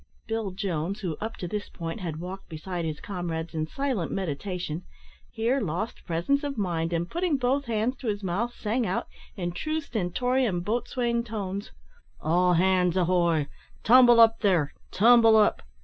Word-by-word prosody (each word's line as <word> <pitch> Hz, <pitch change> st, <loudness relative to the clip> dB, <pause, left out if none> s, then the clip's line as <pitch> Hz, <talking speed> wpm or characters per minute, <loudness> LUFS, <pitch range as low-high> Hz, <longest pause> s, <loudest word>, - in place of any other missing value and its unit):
Bill 225 Hz, -2 st, -2 dB
Jones, 185 Hz, -1 st, -3 dB
who, 175 Hz, -6 st, -2 dB
up 220 Hz, +2 st, -4 dB
to 180 Hz, -, -5 dB
this 205 Hz, +3 st, -4 dB
point, 165 Hz, +4 st, -6 dB
had 165 Hz, -5 st, -4 dB
walked 185 Hz, +2 st, -7 dB
beside 170 Hz, +2 st, -4 dB
his 155 Hz, -2 st, -3 dB
comrades 170 Hz, -4 st, -4 dB
in 155 Hz, -1 st, -2 dB
silent 255 Hz, -, -2 dB
meditation, 180 Hz, -1 st, -3 dB, 0.5 s
here 240 Hz, +4 st, 0 dB
lost 190 Hz, +4 st, -3 dB
presence 175 Hz, -, +1 dB
of 280 Hz, -3 st, -3 dB
mind 170 Hz, -5 st, -1 dB
and, 170 Hz, 0 st, -1 dB
putting 345 Hz, -, 0 dB
both 270 Hz, +2 st, +1 dB
hands 235 Hz, +2 st, -1 dB
to 245 Hz, -, -7 dB
his 205 Hz, -1 st, -2 dB
mouth, 195 Hz, +7 st, -1 dB
sang 235 Hz, +1 st, -1 dB
out, 185 Hz, -, -1 dB, 0.3 s
in 175 Hz, -2 st, -3 dB
true 310 Hz, -, -2 dB
stentorian 240 Hz, -, 0 dB
boatswain 235 Hz, +3 st, -1 dB
tones, 205 Hz, -3 st, -4 dB, 0.5 s
"All 180 Hz, +3 st, +3 dB
hands 180 Hz, 0 st, +3 dB
ahoy! 170 Hz, -4 st, +2 dB, 0.4 s
tumble 240 Hz, 0 st, +7 dB
up 225 Hz, 0 st, +6 dB
there 180 Hz, -8 st, +2 dB, 0.2 s
tumble 225 Hz, +1 st, +6 dB
up!" 210 Hz, -, +3 dB
195 Hz, 160 wpm, -27 LUFS, 175-235 Hz, 0.5 s, tumble